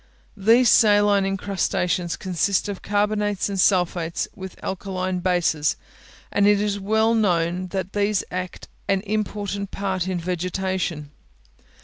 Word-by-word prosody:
These 225 +4 +4
saline 205 -2 +4
incrustations 185 -2 -1
consist 185 +2 0
of 200 -2 -5
carbonates 205 -1 0
and 195 -1 -3
sulphates, 175 -3 +1
with 190 -1 -9
alkaline 185 -1 -3
bases; 175 -5 +1 0.6
and 205 0 +3
it 205 -1 +4
is 205 -1 -1
well 220 +3 +2
known 180 -4 +1 0.3
these 205 -1 +1
act 185 0 -5 0.2
an 195 -1 +1
important 205 -1 -3
part 190 -3 -2
in 185 -2 -1
vegetation. 180 -3 -3
195 Hz, 115 wpm, -23 LUFS, 180-205 Hz, 0.6 s, These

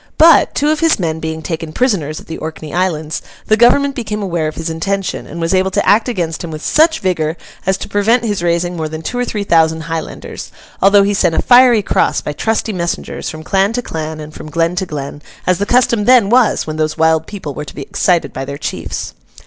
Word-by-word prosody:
But, 325 +1 +6
two 295 +1 +2
of 310 - 0
his 330 0 +3
men 160 -3 -2
being 160 0 -4
taken 165 -2 -4
prisoners 170 - 0
at - - -14
the 160 - -7
Orkney 155 -1 -7
Islands, 160 -4 -1 0.2
the 215 - +3
Government 275 +5 +4
became 210 -5 -4
aware 170 -4 -1
of 155 - -5
his 165 - -4
intention, 190 +4 -3
and 170 - -8
was 165 +2 0
able 190 0 +2
to - - -1
act 220 +4 +4
against 170 -8 -3
him 170 - -5
with 155 -1 -7
such 320 +1 +3
vigour 165 -4 -1 0.3
as 190 0 +2
to - - -6
prevent 225 +4 +2
his 205 -5 -1
raising 175 +1 0
more 160 -2 -3
than 160 +1 -7
two 245 +9 -3
or 245 - 0
three 210 -3 -3
thousand 160 -3 +2
Highlanders, 160 0 -6 0.3
although 200 +1 +6
he 200 +1 +1
sent 175 -5 +1
a - - +2
fiery 245 -3 +6
cross, - - +1
by 150 - -5
trusty 220 +5 -1
messengers, 170 -2 -3
from 155 0 -8
clan 195 +5 +1
to 245 +1 -2
clan 155 -3 -5
and 150 0 -9
from 155 - -9
glen 165 +3 0
to 190 - -1
glen, 145 -2 -6 0.2
as 185 0 +2
the 205 - -1
custom 235 -3 +2
then 240 -4 +5
was 245 -2 +3
when 155 0 -5
those 155 0 -1
wild 160 0 +2
people 180 -9 -6
were 150 - -5
to - - -11
be - - -5
excited 170 -6 0
by 135 - -4
their 140 +1 -6
chiefs. - - -5
175 Hz, 230 wpm, -16 LUFS, 160-210 Hz, 0.3 s, But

